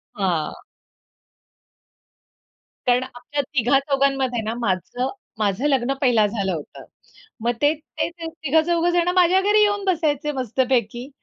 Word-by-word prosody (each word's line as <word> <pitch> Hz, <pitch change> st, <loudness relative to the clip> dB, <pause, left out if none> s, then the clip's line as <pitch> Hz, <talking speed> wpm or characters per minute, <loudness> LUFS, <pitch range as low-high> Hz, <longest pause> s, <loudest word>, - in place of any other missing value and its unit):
हां. 175 Hz, -6 st, -2 dB, 2.2 s
कारण 245 Hz, +1 st, +3 dB
आमच्या 260 Hz, +3 st, -4 dB
तिघा-चौघांमध्ये 275 Hz, -1 st, +1 dB
ना 220 Hz, +1 st, -2 dB
माझं 235 Hz, +5 st, -1 dB, 0.3 s
माझं 210 Hz, +6 st, +1 dB
लग्न 270 Hz, -2 st, +1 dB
पहिला 240 Hz, -5 st, +4 dB
झालं 200 Hz, -3 st, -2 dB
होतं. 155 Hz, -3 st, -8 dB, 0.6 s
मग 235 Hz, +2 st, +1 dB
ते 290 Hz, +2 st, +4 dB
ते 310 Hz, +2 st, -4 dB, 0.2 s
तिघं-चौघजणं 340 Hz, +3 st, +1 dB
माझ्या 365 Hz, +1 st, +5 dB
घरी 415 Hz, +2 st, +4 dB
येऊन 410 Hz, -1 st, +2 dB
बसायचे 305 Hz, -5 st, 0 dB
मस्तपैकी. 250 Hz, -1 st, -1 dB
265 Hz, 105 wpm, -22 LUFS, 235-315 Hz, 2.2 s, माझ्या